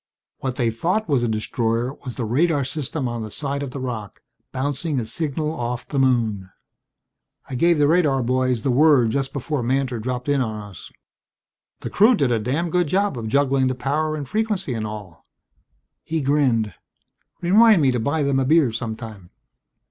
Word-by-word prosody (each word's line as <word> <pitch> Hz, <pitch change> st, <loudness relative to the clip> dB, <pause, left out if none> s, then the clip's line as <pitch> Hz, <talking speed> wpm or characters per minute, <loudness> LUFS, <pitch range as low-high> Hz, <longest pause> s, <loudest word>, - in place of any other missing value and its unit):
"What 130 Hz, -2 st, -3 dB
they 120 Hz, -4 st, +1 dB
thought 180 Hz, -, -1 dB
was 140 Hz, -6 st, +2 dB
a 120 Hz, -, 0 dB
destroyer 115 Hz, +2 st, -1 dB
was 125 Hz, -4 st, -6 dB
the 120 Hz, -, -3 dB
radar 145 Hz, +5 st, +2 dB
system 145 Hz, 0 st, -3 dB
on 120 Hz, -1 st, -4 dB
the 110 Hz, -, -5 dB
side 140 Hz, +5 st, -3 dB
of 140 Hz, -, -4 dB
the 135 Hz, -, -7 dB
rock, 115 Hz, -6 st, -6 dB, 0.3 s
bouncing 140 Hz, +2 st, -2 dB
a 115 Hz, -, -3 dB
signal 150 Hz, +5 st, -2 dB
off 125 Hz, -5 st, -4 dB
the 140 Hz, -, -2 dB
moon. 115 Hz, -7 st, +1 dB, 1.0 s
I -, -, -8 dB
gave 170 Hz, +6 st, +3 dB
the 145 Hz, -1 st, +4 dB
radar 150 Hz, -5 st, +3 dB
boys 130 Hz, -1 st, 0 dB
the 135 Hz, -, +1 dB
word 135 Hz, -4 st, +4 dB
just 135 Hz, +1 st, -1 dB
before 140 Hz, 0 st, -3 dB
Mantor 130 Hz, 0 st, 0 dB
dropped 125 Hz, +3 st, -4 dB
in 145 Hz, -1 st, +2 dB
on 110 Hz, -3 st, -3 dB
us. 90 Hz, -, -12 dB, 0.9 s
The -, -, -5 dB
crew 225 Hz, +5 st, +5 dB
did 140 Hz, -, +1 dB
a 115 Hz, -, +2 dB
damned 145 Hz, +10 st, -1 dB
good 180 Hz, -1 st, +2 dB
job 195 Hz, +1 st, +1 dB
of 115 Hz, -2 st, -5 dB
juggling 135 Hz, +1 st, +2 dB
the 130 Hz, -, -1 dB
power 150 Hz, +5 st, -1 dB
and 145 Hz, -3 st, -5 dB
frequency 210 Hz, -, -1 dB
and 110 Hz, -2 st, -3 dB
all." 105 Hz, -5 st, -9 dB, 0.8 s
He 160 Hz, 0 st, -2 dB
grinned. 130 Hz, -, +1 dB, 0.7 s
"Remind 210 Hz, +3 st, +6 dB
me 135 Hz, -, +4 dB
to 125 Hz, -, -1 dB
buy 145 Hz, +6 st, 0 dB
them 140 Hz, -1 st, +1 dB
a 135 Hz, -, +1 dB
beer 150 Hz, -3 st, +4 dB
sometime." 110 Hz, -5 st, -6 dB
130 Hz, 185 wpm, -22 LUFS, 120-150 Hz, 1.0 s, Remind